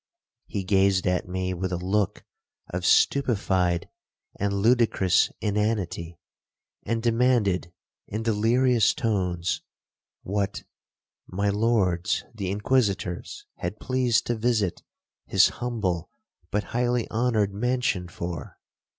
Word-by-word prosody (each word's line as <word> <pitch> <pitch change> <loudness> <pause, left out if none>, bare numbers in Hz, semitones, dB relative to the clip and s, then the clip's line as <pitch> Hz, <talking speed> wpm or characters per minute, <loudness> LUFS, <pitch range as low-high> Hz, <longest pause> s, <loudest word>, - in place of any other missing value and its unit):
He 100 -3 -3
gazed 95 0 +3
at 90 -1 0
me 95 0 -2
with 90 +1 -3
a 90 - -1
look 95 +3 -1 0.5
of 90 +1 -1
stupified 95 -10 +2 0.5
and 100 0 0
ludicrous 110 -2 +3
inanity, 100 -5 -1 0.7
and 115 +1 -2
demanded 115 -7 +2 0.4
in 110 +2 -4
delirious 115 +2 +3
tones, 90 -5 -1 0.6
what 100 0 -2 0.6
'my 100 +2 -1
lords 100 -4 +1
the 100 -5 -4
Inquisitors 100 -4 -1
had 90 +5 -4
pleased 130 -3 +1
to 120 - 0
visit 110 -5 0 0.5
his - - +5
humble 105 -9 -2 0.4
but 105 0 0
highly 120 -1 +1
honoured 110 -4 +1
mansion 125 -4 0
for?' 85 0 -6
100 Hz, 105 wpm, -26 LUFS, 90-115 Hz, 0.7 s, his